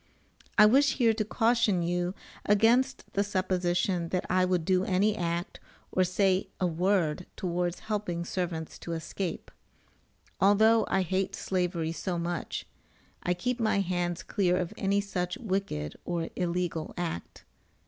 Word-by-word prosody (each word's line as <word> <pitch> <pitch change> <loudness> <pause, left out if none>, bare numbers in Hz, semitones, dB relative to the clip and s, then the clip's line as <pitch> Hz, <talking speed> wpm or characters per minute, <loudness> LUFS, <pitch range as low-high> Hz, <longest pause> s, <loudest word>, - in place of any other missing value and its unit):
[I 210 - +9
wish 275 +6 +5
here 230 -4 +4
to 215 0 -1
caution 225 -4 +2
you 175 +2 -1 0.3
against 230 +6 +2
the 200 - +2
supposition 180 -3 0
that 180 0 -1
I 185 0 +4
would 180 -3 0
do 185 0 +3
any 195 +3 +2
act, 170 -2 -3 0.3
or 185 - +3
say 185 +1 +2
a 185 - +1
word 180 -1 +1
towards 175 -1 -2
helping 200 -6 -2
servants 170 -3 -3
to 170 - -5
escape. 165 +2 -4 0.9
Although 220 +3 +5
I 190 -1 +2
hate 190 +2 -1
slavery 175 -3 -1
so 175 +1 -3
much, 170 0 -3 0.6
I 180 - 0
keep 245 +7 -2
my 220 -3 +2
hands 175 -1 -2
clear 180 -3 +1
of 180 +2 -2
any 200 0 +1
such 180 -3 -3
wicked 190 - -2
or 170 -2 -2
illegal 175 -2 -2
act. 165 - -5
185 Hz, 140 wpm, -29 LUFS, 175-200 Hz, 0.9 s, I